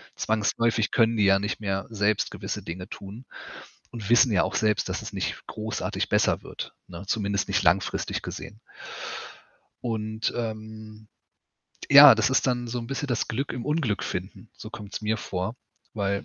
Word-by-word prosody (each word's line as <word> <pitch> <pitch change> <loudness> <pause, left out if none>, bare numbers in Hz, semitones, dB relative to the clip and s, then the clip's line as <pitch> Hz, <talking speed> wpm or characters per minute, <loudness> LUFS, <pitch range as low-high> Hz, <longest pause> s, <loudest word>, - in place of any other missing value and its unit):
Zwangsläufig 110 +1 +1
können 115 -1 +3
die 105 - +4
ja 100 0 +5
nicht 105 +2 -3
mehr 95 -1 -2
selbst 105 -1 +1
gewisse - - -5
Dinge 90 +2 -6
tun 105 +6 -9 0.7
und 110 -3 -6
wissen 120 0 +6
ja 95 - +3
auch - - -3
selbst, 105 -1 +1
dass - - -2
es - - -8
nicht - - -3
großartig 110 +1 -3
besser - - +2
wird, - - -7
ne? 85 +1 -9
Zumindest 100 -2 0
nicht 100 0 +1
langfristig 90 +3 +1
gesehen. 105 - -8 1.2
Und, 110 -1 -2
ähm, 110 -1 -6 0.8
ja, - - +11
das - - +2
ist - - +2
dann 120 -1 0
so 120 +1 -3
‘n 115 - -5
bisschen 135 +3 -3
das 120 -3 -1
Glück 135 +5 -2
im 120 - -5
Unglück 150 - 0
finden, 95 +5 -6
so 110 -1 -9
kommt‘s 105 0 -7
mir 110 +1 +1
vor, 95 +3 -3 0.4
weil 100 -2 -1
110 Hz, 165 wpm, -26 LUFS, 100-115 Hz, 1.2 s, ja